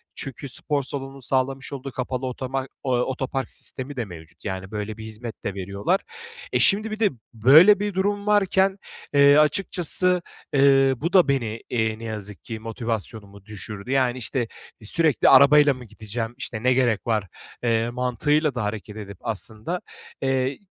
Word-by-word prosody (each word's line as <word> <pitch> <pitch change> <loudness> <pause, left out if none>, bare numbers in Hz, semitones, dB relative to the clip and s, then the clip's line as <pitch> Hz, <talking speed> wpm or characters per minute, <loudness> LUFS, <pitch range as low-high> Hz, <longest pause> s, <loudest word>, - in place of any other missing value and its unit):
Çünkü 135 0 -7
spor 145 +2 -1
salonunun 135 0 -6
sağlamış 135 +2 -1
olduğu 135 0 -6
kapalı 130 +1 -3
otomar 130 +1 -3 0.2
ııı, 125 -1 +2
otopark 130 0 -3
sistemi 135 +2 -4
de 120 -3 -2
mevcut. 80 -2 -13
Yani, 95 0 -5
böyle 105 0 -4
bir 110 - -8
hizmet 110 +1 -7
de 100 - -2
veriyorlar. 100 - -1 0.5
E, - - +1
şimdi 215 +2 +3
bir 215 - -5
de 210 -3 +4 0.2
böyle 155 - +7
bir 205 -1 -2
durum 200 +2 -1
varken, 195 -1 +3 0.4
eee, 140 +1 +7
açıkçası, 180 +2 +2 0.3
eee, 135 -1 +5
bu 170 +9 -3
da 180 -5 +6
beni, 115 -5 -1
ııı, 110 -1 0
ne - - -10
yazık 105 -3 -6
ki 110 -2 -6
motivasyonumu 110 -3 -5
düşürdü. 105 +2 -8
Yani, 130 -2 +2
işte, 120 0 -2 0.4
"Sürekli 155 +6 +3
arabayla 145 +1 +7
mı 125 -1 -11
gideceğim, 115 +2 -6
işte, 115 -3 -5
ne 125 0 +4
gerek 120 -4 +1
var?" 105 -4 0 0.4
eee, 115 0 +1
mantığıyla 130 +4 0
da 115 - -1
hareket 105 0 -5
edip 100 -3 -8
aslında, 110 - -3 0.4
eee, 135 0 0
130 Hz, 160 wpm, -24 LUFS, 110-145 Hz, 0.5 s, böyle